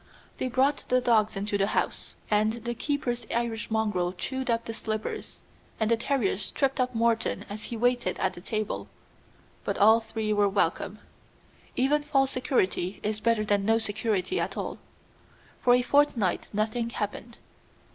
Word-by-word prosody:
They - - 0
brought 265 +3 +2
the 255 - +4
dogs 225 -4 +3
into 205 +1 -1
the 195 - +3
house, - - -2 0.2
and 215 +1 +3
the 235 +1 -4
keeper's 245 -3 -2
Irish 235 -1 -2
mongrel 210 -5 0
chewed 260 +7 -4
up 230 0 +1
the 225 - -4
slippers, 220 -1 -4 0.4
and 220 0 +1
the - - +6
terriers 225 -5 0
tripped 270 -1 0
up 250 -1 0
Morton 230 0 +1
as 210 +1 -5
he 235 - -5
waited 245 +1 +1
at 190 0 0
table; 215 0 -3 0.8
but - - -2
all 220 +3 +7
three 220 -1 -2
were 205 -1 +3
welcome. 195 +1 0 0.8
Even 280 +4 +3
false 275 -2 +2
security 205 -7 0
is 210 0 -1
better 225 -1 +2
than 205 -1 +2
no 225 +2 +3
security 215 - -1
at - - -2
all. - - -4 0.8
For 245 0 +5
a 250 - +2
fortnight 250 -9 +2
nothing 220 +3 -1
happened. 225 +2 -5
225 Hz, 155 wpm, -28 LUFS, 210-245 Hz, 0.8 s, all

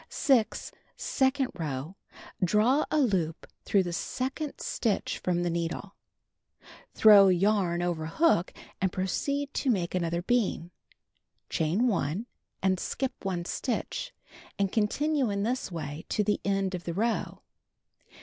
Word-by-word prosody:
6. 250 -6 +1 0.3
Second 265 -1 +1
row: 155 -1 -4 0.5
Draw 215 - +3
a - - +1
loop 185 - 0 0.2
through 195 -2 +3
the 175 -1 -4
second 265 - -3
stitch 220 -5 -1
from 175 -1 0
the 175 - 0
needle. 170 +4 -3 1.0
Throw 205 -3 +8
yarn 185 -2 +2
over 165 -3 -2
hook 195 - +2 0.3
and 190 -1 +2
proceed 280 +11 -2
to 275 - -1
make 185 -7 0
another 170 -1 -1
bean. 200 -6 0 0.8
Chain 175 +10 +1
1, 190 - -1 0.4
and 190 -1 +2
skip 265 +6 -2
1 180 -3 -2
stitch 240 +6 -3 0.5
and 200 -2 0
continue 270 +5 +1
in 200 0 -1
this 245 -2 -2
way 155 -1 -6
to 210 - +1
the 210 +1 0
end 195 -1 0
of 175 -1 -5
the 170 - -3
row. 225 +3 -1
195 Hz, 130 wpm, -28 LUFS, 175-240 Hz, 1.0 s, Throw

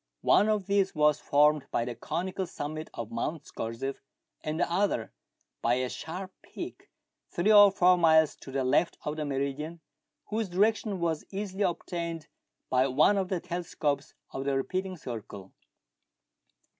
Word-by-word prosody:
One 210 - +5
of 210 -3 +1
these 195 0 +1
was 150 -1 +4
formed 150 0 +3
by 115 - 0
the 120 - -4
conical 185 - -3
summit 155 0 -5
of 115 -2 -5
Mount 145 +6 -3
Scorzef, 115 +5 -4 0.5
and 155 +1 -2
the - - +2
other 175 - 0 0.5
by 120 +1 +3
a 130 0 -1
sharp 185 +7 -6
peak - - -9 0.4
three 200 +5 +2
or 205 -1 +9
four 180 -2 +4
miles 160 -2 +5
to 135 - -11
the 135 0 0
left 145 +6 +2
of 150 - -2
the 155 - -2
meridian, 140 +4 -3 0.5
whose 215 -1 -2
direction 205 +1 +1
was 165 -2 -1
easily 195 0 -4
obtained 170 -2 -3 0.4
by 130 +1 +3
one 145 +10 +4
of 190 -2 -1
the 185 - 0
telescopes 160 -4 -2 0.2
of 135 - -4
the 140 -1 +1
repeating 185 +6 -2
circle. 105 - -8
160 Hz, 155 wpm, -29 LUFS, 140-190 Hz, 0.5 s, or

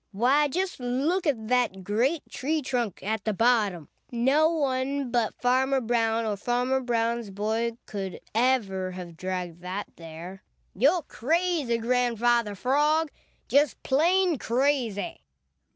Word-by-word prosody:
Why, 265 +8 +3
just 365 +4 -2
look 280 +9 0
at 225 -7 -1
that 245 -7 +1
great 245 - 0
tree 305 +3 -2
trunk 240 -6 -2
at 215 +1 -2
the 215 - 0
bottom! 205 - +2 0.2
No 270 +6 +3
one 275 -3 -1
but 235 -3 0
Farmer 265 +2 +2
Brown 230 -1 +1
or 215 -2 -1
Farmer 245 +4 0
Brown's 235 -2 -1
boy 220 +4 -1
could 195 -3 -5
ever 215 -6 +1
have 180 -2 -8
dragged 180 -1 -4
that 185 +3 -4
there. 170 +3 -9 0.3
You're 300 - +3
crazy, 310 -2 0
Grandfather 235 -2 +1
Frog, 295 +7 +2 0.4
just 285 -1 +2
plain 340 +3 +2
crazy." 245 -4 0
240 Hz, 125 wpm, -27 LUFS, 210-275 Hz, 0.4 s, Why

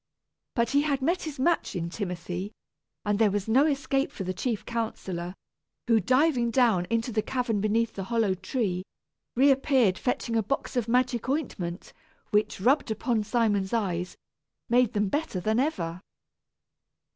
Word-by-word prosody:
But 235 -2 +1
he 285 +1 +4
had 280 -3 0
met 345 +5 +1
his 310 -3 -6
match 335 -5 +1
in 170 -1 -3
Timothy, 180 0 -4 0.5
and 205 0 +1
there 220 -2 +5
was 200 0 -2
no 265 +7 +4
escape 275 -1 0
for 195 - -6
the 185 0 -2
chief 215 +3 -2
counsellor, 190 -6 -4 0.5
who, 230 -2 +4
diving 255 - +2
down 225 -7 +3
into 230 +1 0
the 215 -1 +1
cavern 240 -4 -1
beneath 225 +2 +1
the 195 - -5
hollow 225 -3 +1
tree, 190 0 -2 0.5
reappeared 265 -6 +4
fetching 245 -2 -1
a 225 - +3
box 275 +5 -3
of 240 -3 0
magic 250 0 +1
ointment, 195 - -3 0.4
which, 210 0 +1
rubbed 260 +7 +3
upon 220 0 0
Simon's 210 -3 +1
eyes, 180 -5 -1 0.5
made 245 -1 +3
them 205 0 +1
better 290 -3 -2
than 220 +5 +1
ever. 180 - -1
225 Hz, 155 wpm, -27 LUFS, 195-260 Hz, 0.5 s, there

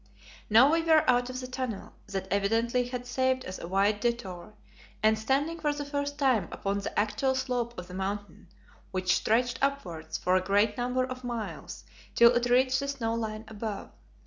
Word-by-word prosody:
Now 235 +7 +7
we 330 +1 +3
were 320 -2 +4
out 245 0 +3
of 255 0 -5
the - - -5
tunnel, 255 -5 -5
that 195 -1 -4
evidently 230 +5 +1
had 245 0 -5
saved 260 +1 0
us 185 - -6
a - - -6
wide 200 +3 +2
detour, 210 -4 -3 0.5
and 220 0 +5
standing 275 +9 0
for 300 -2 +1
the 290 0 -5
first 285 0 -3
time 255 - +2
upon 200 0 -2
the 200 - -5
actual 220 +6 +1
slope 245 -2 -2
of 180 - -7
the 180 - -10
Mountain, 195 +1 -5 0.4
which 185 -1 +1
stretched 240 +3 +1
upwards 275 - -2
for 185 - +1
a 185 - +3
great 205 +3 +2
number 250 +1 0
of 255 0 -7
miles 240 -3 -5 0.3
till 235 0 +7
it 240 0 +1
reached 255 +1 +4
the 280 - -3
snow 245 -5 -2
line 220 -1 -3
above. 215 -2 -6
235 Hz, 185 wpm, -29 LUFS, 205-260 Hz, 0.5 s, Now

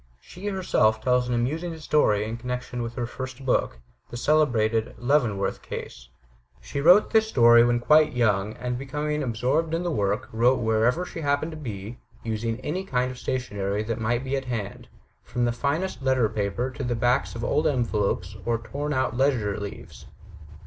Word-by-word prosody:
She, 180 - -9
herself, 175 - +2
tells 125 +1 +1
an 125 - 0
amusing 160 +8 -2
story 140 -9 +2
in 115 +1 -4
connection 125 0 -4
with 115 0 -5
her 120 - -2
first 130 +2 -7
book, 125 - +1 0.3
the 120 - -6
celebrated 115 -6 +2
"Leavenworth 120 -7 0
Case." - - -8 0.5
She 140 - -5
wrote 180 +7 +6
this 220 -1 +4
story 120 - +6
when 120 0 +2
quite 150 +5 +4
young; 105 -4 +1
and, 125 +1 -4
becoming 150 +2 -2
absorbed 135 +7 0
in 170 - -2
the 175 - -1
work, 105 -4 -1
wrote 120 +4 +3
wherever 115 +9 +1
she 170 - -7
happened 145 +2 0
to - - -7
be, 115 -6 -7 0.2
using 115 +1 -2
any 175 +8 -3
kind 125 -7 -1
of 125 - -10
stationery 105 -5 -2
that 115 +1 -3
might 120 +3 0
be 135 +1 -2
at 135 -1 -3
hand, 110 -5 -5 0.3
from 120 0 -2
finest 140 +5 -2
letter 130 -3 +2
paper 105 +4 -2
to 135 - -6
backs 120 +3 +1
of 115 - -5
old 150 +6 +1
envelopes 105 - -1
or 120 -1 0
torn 145 +6 -4
out 130 -3 0
ledger 120 -7 +1
leaves. 100 -1 -9
125 Hz, 170 wpm, -25 LUFS, 110-145 Hz, 0.5 s, wrote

